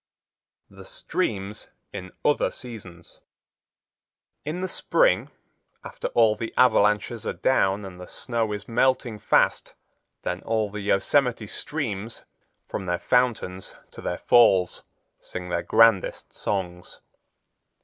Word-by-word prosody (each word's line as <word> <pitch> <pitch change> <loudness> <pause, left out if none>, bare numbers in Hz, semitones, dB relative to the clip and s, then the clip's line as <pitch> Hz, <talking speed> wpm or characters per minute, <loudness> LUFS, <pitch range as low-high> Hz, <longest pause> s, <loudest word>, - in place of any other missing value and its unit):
The - - -12
Streams 105 - -3 0.3
In 90 0 -7
Other 145 - +3
Seasons 95 -9 -10 1.2
In 160 +5 -4
the 185 - -1
spring, - - +2 0.5
after - - -5
all 115 -2 +5
the 115 +1 -5
avalanches 105 -2 +3
are - - -1
down 100 -6 +1
and 90 -1 -10
the 90 - -9
snow 115 -3 -2
is 105 0 -5
melting 120 -2 +1
fast, - - +2 0.5
then 90 +1 -3
all 110 -2 -1
the 105 0 -5
Yosemite 115 +4 +1
streams, 115 -3 -4 0.4
from 95 - -5
their 90 0 0
fountains 115 -6 0 0.2
to - - -10
their 90 - -3
falls, 95 -7 +4 0.4
sing 90 0 -7
their 85 -1 0
grandest 115 -3 +3
songs. 90 -3 -4
105 Hz, 120 wpm, -25 LUFS, 95-120 Hz, 1.2 s, all